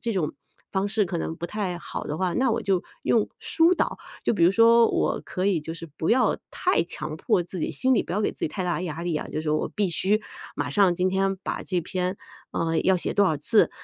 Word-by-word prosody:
这 230 Hz, 0 st, -2 dB
种 180 Hz, -7 st, -1 dB, 0.4 s
方 195 Hz, +1 st, 0 dB
式 215 Hz, 0 st, +1 dB
可 175 Hz, -1 st, -3 dB
能 165 Hz, -, -3 dB
不 170 Hz, -, -4 dB
太 185 Hz, -3 st, -3 dB
好 -, -, -6 dB
的 150 Hz, -, -4 dB
话， 185 Hz, -2 st, 0 dB
那 260 Hz, -1 st, +2 dB
我 230 Hz, -, 0 dB
就 190 Hz, -3 st, +1 dB, 0.2 s
用 -, -, +2 dB
疏 335 Hz, +2 st, +3 dB
导。 -, -, -1 dB, 0.3 s
就 -, -, +2 dB
比 170 Hz, -, +3 dB
如 175 Hz, -, +6 dB
说 230 Hz, +2 st, +6 dB
我 -, -, 0 dB
可 185 Hz, +1 st, -2 dB
以 190 Hz, -5 st, +2 dB
就 160 Hz, +2 st, -6 dB
是 165 Hz, 0 st, -8 dB
不 160 Hz, -, 0 dB
要 250 Hz, +2 st, +3 dB
太 370 Hz, -, +1 dB
强 155 Hz, -2 st, -5 dB
迫 175 Hz, -, +1 dB
自 180 Hz, +1 st, -6 dB
己， -, -, -1 dB
心 260 Hz, 0 st, +2 dB
里 -, -, +2 dB
不 -, -, -6 dB
要 200 Hz, -, 0 dB
给 210 Hz, -, 0 dB
自 -, -, -21 dB
己 -, -, 0 dB
太 185 Hz, +4 st, -4 dB
大 175 Hz, -1 st, 0 dB
的 -, -, -3 dB
压 165 Hz, -2 st, -4 dB
力 175 Hz, -2 st, -1 dB
啊， -, -, -3 dB
就 -, -, -3 dB
是 155 Hz, -1 st, -2 dB
我 155 Hz, -, 0 dB
必 205 Hz, -2 st, -1 dB
须 195 Hz, +5 st, +1 dB, 0.4 s
马 -, -, -1 dB
上 195 Hz, -4 st, +4 dB
今 180 Hz, +1 st, +2 dB
天 195 Hz, +1 st, +1 dB
把 -, -, -3 dB
这 180 Hz, -2 st, -1 dB
篇 180 Hz, +3 st, -2 dB, 0.3 s
啊， 165 Hz, 0 st, -1 dB
要 190 Hz, 0 st, +4 dB
写 175 Hz, -, -2 dB
多 205 Hz, -, +4 dB
少 160 Hz, -5 st, +2 dB
字。 210 Hz, +10 st, +3 dB
185 Hz, 280 characters per minute, -25 LUFS, 170-210 Hz, 0.4 s, 如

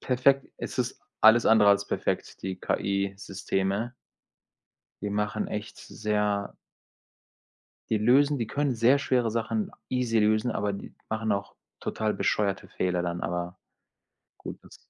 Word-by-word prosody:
perfekt, 135 Hz, +2 st, +3 dB
es -, -, -6 dB
ist -, -, -2 dB, 0.2 s
alles 110 Hz, +2 st, +7 dB
andere 105 Hz, -2 st, +6 dB
als 100 Hz, 0 st, +2 dB
perfekt, -, -, -2 dB
die 95 Hz, 0 st, -3 dB
KI-Systeme. 100 Hz, +3 st, -2 dB, 1.1 s
Die 105 Hz, -, -2 dB
machen 105 Hz, +1 st, -1 dB
echt 105 Hz, -1 st, -5 dB
sehr 105 Hz, -1 st, -1 dB, 1.4 s
die 110 Hz, -, +2 dB
lösen 140 Hz, +6 st, +4 dB
die 115 Hz, -, -1 dB
können 140 Hz, +3 st, 0 dB
sehr 120 Hz, +5 st, +5 dB
schwere 125 Hz, -4 st, +1 dB
Sachen 190 Hz, -, -1 dB, 0.2 s
easy 125 Hz, -3 st, +1 dB
lösen, 110 Hz, +3 st, +2 dB
aber 100 Hz, -1 st, -1 dB
die 100 Hz, -, -8 dB
machen 110 Hz, 0 st, -1 dB
auch 100 Hz, 0 st, -3 dB, 0.2 s
total 110 Hz, -1 st, -1 dB
bescheuerte 100 Hz, -2 st, 0 dB
Fehler 90 Hz, -1 st, -1 dB
dann 85 Hz, 0 st, -3 dB
aber. 90 Hz, +1 st, -3 dB, 0.8 s
Gut, -, -, -8 dB
das -, -, -15 dB
105 Hz, 135 wpm, -27 LUFS, 100-120 Hz, 1.4 s, alles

